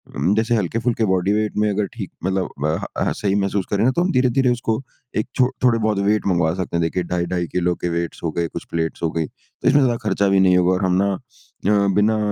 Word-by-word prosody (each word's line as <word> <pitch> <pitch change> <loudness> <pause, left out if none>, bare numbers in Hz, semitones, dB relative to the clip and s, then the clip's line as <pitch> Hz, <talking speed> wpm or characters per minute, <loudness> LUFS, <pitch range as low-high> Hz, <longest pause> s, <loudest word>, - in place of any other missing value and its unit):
उम, 95 - +1
जैसे 115 +2 +1
हल्के-फुल्के 115 +3 0
body 95 0 +1
weight 105 0 -1
में 105 0 +2
अगर 105 0 0
ठीक - - -6
मतलब 95 -1 0 0.2
अ, - - +3
ह, - - -5
अ, - - +1
सही 100 -1 -1
महसूस 100 -1 0
करें 100 - +2
न 130 - +4
तो 170 - 0
हम 185 - 0
धीरे-धीरे 130 0 +2
उसको 115 0 -1 0.4
एक 110 - 0
छो 125 -1 +3
थोड़े 120 -2 +4
बहुत 105 -2 0
वेट 105 -1 +1
मँगवा 85 -3 +2
सकते 90 -2 -2
हैं। 85 - +1
देखिए 85 +2 -1
ढाई-ढाई 85 0 -1
किलो 90 -1 +1
के 90 - +1
वेट्स 85 0 -3
हो 80 - -1
गए 85 - +1
कुछ - - -7
प्लेट्स 80 0 -2
हो 80 - +1
गई 80 0 -1
तो - - -9
इसमें 145 +1 +5
ज़्यादा 120 -3 +2
खर्चा 100 - +2
भी 95 - +4
नहीं 90 -1 +5
होगा 90 0 +3
और 95 +1 0
हम 90 - +2
ना 100 - +2
अ, 100 +2 -2
बिना 110 +2 +3
100 Hz, 250 wpm, -21 LUFS, 90-110 Hz, 0.4 s, इसमें